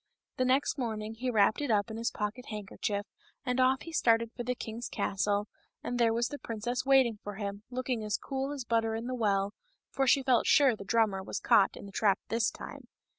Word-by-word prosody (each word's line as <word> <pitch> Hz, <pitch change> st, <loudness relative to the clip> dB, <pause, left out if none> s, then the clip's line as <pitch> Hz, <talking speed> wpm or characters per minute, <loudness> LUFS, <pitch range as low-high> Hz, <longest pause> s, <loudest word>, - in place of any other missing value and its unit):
The 255 Hz, -, +2 dB
next 270 Hz, +3 st, +1 dB
morning 220 Hz, -3 st, -3 dB
he 250 Hz, +3 st, -3 dB
wrapped 215 Hz, +2 st, +3 dB
it 290 Hz, -, -2 dB
up 215 Hz, 0 st, +1 dB
in 220 Hz, -, -5 dB
his 230 Hz, +1 st, 0 dB
pocket 210 Hz, +4 st, -4 dB
handkerchief 205 Hz, -1 st, -3 dB, 0.4 s
and 250 Hz, 0 st, 0 dB
off 260 Hz, +1 st, +3 dB
he 330 Hz, -, -8 dB
started 230 Hz, -5 st, +3 dB
for 240 Hz, -, -5 dB
the 250 Hz, +1 st, -1 dB
king's 230 Hz, 0 st, -6 dB
castle, 205 Hz, +1 st, 0 dB, 0.4 s
and 245 Hz, 0 st, -3 dB
there 230 Hz, -1 st, +4 dB
was 235 Hz, +1 st, 0 dB
the 290 Hz, -, -7 dB
princess 230 Hz, +2 st, -3 dB
waiting 260 Hz, -5 st, +4 dB
for 205 Hz, -1 st, -6 dB
him, 200 Hz, 0 st, -5 dB
looking 250 Hz, -2 st, -2 dB
as 210 Hz, 0 st, -1 dB
cool 270 Hz, 0 st, -3 dB
as 275 Hz, -4 st, -5 dB
butter 225 Hz, -1 st, +1 dB
in 225 Hz, +1 st, -4 dB
the 255 Hz, -, -3 dB
well, 200 Hz, -4 st, +1 dB, 0.4 s
for 270 Hz, 0 st, 0 dB
she 270 Hz, +1 st, +4 dB
felt 255 Hz, -2 st, +3 dB
sure 275 Hz, -5 st, +5 dB
the 205 Hz, -, -9 dB
drummer 205 Hz, -1 st, +1 dB
was 190 Hz, -, -4 dB
caught 195 Hz, -, +4 dB
in -, -, -9 dB
the 200 Hz, -, -10 dB
trap 200 Hz, -1 st, +2 dB
this 225 Hz, -1 st, +2 dB
time. -, -, -10 dB
230 Hz, 220 wpm, -30 LUFS, 210-255 Hz, 0.4 s, sure